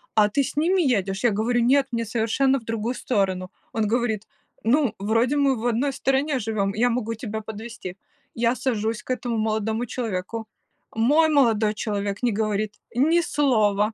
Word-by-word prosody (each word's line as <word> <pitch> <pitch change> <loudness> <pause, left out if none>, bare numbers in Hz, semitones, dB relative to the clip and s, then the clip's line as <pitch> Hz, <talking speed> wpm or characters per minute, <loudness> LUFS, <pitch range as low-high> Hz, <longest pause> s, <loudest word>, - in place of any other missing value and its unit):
"А 210 -1 +5
ты 275 +7 +1
с - - -5
ними 360 +5 +3
едешь?" 200 - 0
Я 240 - +5
говорю: 230 +4 +1
"Нет, 265 +3 +3
мне 230 -1 -1
совершенно 240 +5 +1
в - - -18
другую 225 +2 -2
сторону". 190 -7 -1 0.2
Он 220 -2 0
говорит: 220 -2 -1 0.4
"Ну, 245 -1 +2
вроде 230 +7 +1
мы 280 -2 +3
в 230 0 -5
одной 245 +4 +1
стороне 270 +1 0
живем, 205 -3 -1
я 235 +4 +2
могу 230 -1 -1
тебя 220 -1 -5
подвезти". 220 -3 -8 0.4
Я 235 +1 +1
сажусь 225 -4 -1
к - - -21
этому 245 -2 -2
молодому 220 +1 -1
человеку. 220 -2 -4 0.5
Мой 295 +9 +4
молодой 225 -8 +3
человек 205 -2 -3
не 245 - +3
говорит 210 0 -1 0.2
ни 320 +7 +4
слова. 220 -9 +2
225 Hz, 170 wpm, -24 LUFS, 215-255 Hz, 0.5 s, А